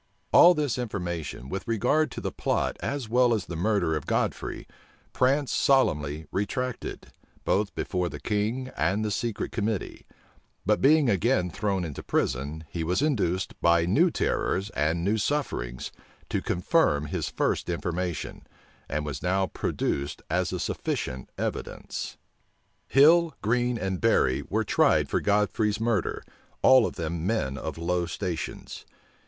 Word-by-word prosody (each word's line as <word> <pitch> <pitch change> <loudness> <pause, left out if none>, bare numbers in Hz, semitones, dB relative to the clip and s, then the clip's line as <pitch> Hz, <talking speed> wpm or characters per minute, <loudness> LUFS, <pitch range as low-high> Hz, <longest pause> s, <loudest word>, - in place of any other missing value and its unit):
All 175 +1 +8
this 145 -5 -1
information, 85 - -4
with 95 +8 -5
regard 125 +7 +2
to - - -7
the - - -3
plot - - -1
as 140 -4 -3
well 120 +1 +4
as 105 - -3
the 85 - -6
murder 90 -2 +1
of 75 - -4
Godfrey, - - -2 0.5
Prance 135 +2 +2
solemnly 75 - +2
retracted, 125 +5 -3 0.3
both 100 0 +1
before 90 -2 -1
the - - -7
king 110 +5 -1
and 95 +8 +1
the 105 - -1
secret 115 +1 -2
committee: 110 -3 -3 0.6
but 105 +2 +2
being 150 0 +5
again 100 -3 +2
thrown 100 0 -1
into 75 -5 -6
prison, 70 +5 -1
he 80 +3 -4
was 90 - 0
induced, 95 - 0
by 85 -1 +4
new 150 - +4
terrors 100 - -1
and 80 +2 0
new 105 +4 +1
sufferings, 95 - -2 0.4
to - - -1
confirm 90 - +2
his - - -3
first - - -1
information, 85 -1 -3 0.5
and 75 +1 -2
was 70 -3 -5
now 95 +2 +1
produced 70 -5 -2
as - - +1
a - - -3
sufficient 65 0 -3
evidence. - - -4 0.7
Hill, 160 +4 +5
Green, 120 +2 +1
and 95 -3 -3
Berry 65 - +3
were - - +1
tried - - +3
for - - 0
Godfrey's 105 +1 +1
murder, 115 -4 0 0.4
all 130 -3 +7
of - - -7
them 85 0 -3
men 70 -12 0
of 80 +2 -5
low 85 +1 0
stations. 85 -2 -5
100 Hz, 145 wpm, -27 LUFS, 85-120 Hz, 0.7 s, All